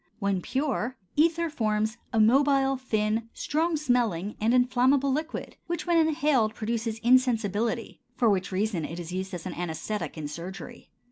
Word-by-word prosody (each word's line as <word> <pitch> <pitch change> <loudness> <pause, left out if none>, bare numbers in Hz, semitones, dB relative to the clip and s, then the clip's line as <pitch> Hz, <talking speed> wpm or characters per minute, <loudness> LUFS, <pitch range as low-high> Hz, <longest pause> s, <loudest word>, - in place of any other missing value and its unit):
When 200 -3 0
pure, 260 -1 -2 0.2
ether 335 +2 +3
forms 215 -4 0
a 225 - +1
mobile, 270 +4 +4
thin, 220 -3 -1
strong 320 +2 0
smelling, 235 - 0
and 220 +2 +3
inflammable 255 +2 +3
liquid 310 +4 -4
which 345 -1 -3
when 345 -1 +3
inhaled 295 -8 +2
produces 225 0 -2
insensibility, 235 -2 +1
for 240 - +2
which 195 -2 +1
reason 190 -3 -1
it 165 +3 -5
is 175 0 -6
used 190 +1 -3
as 175 - -7
an 185 - -4
anæsthetic 175 +4 -4
in 155 -2 -4
surgery. 185 +9 -8
230 Hz, 150 wpm, -27 LUFS, 205-270 Hz, 0.2 s, mobile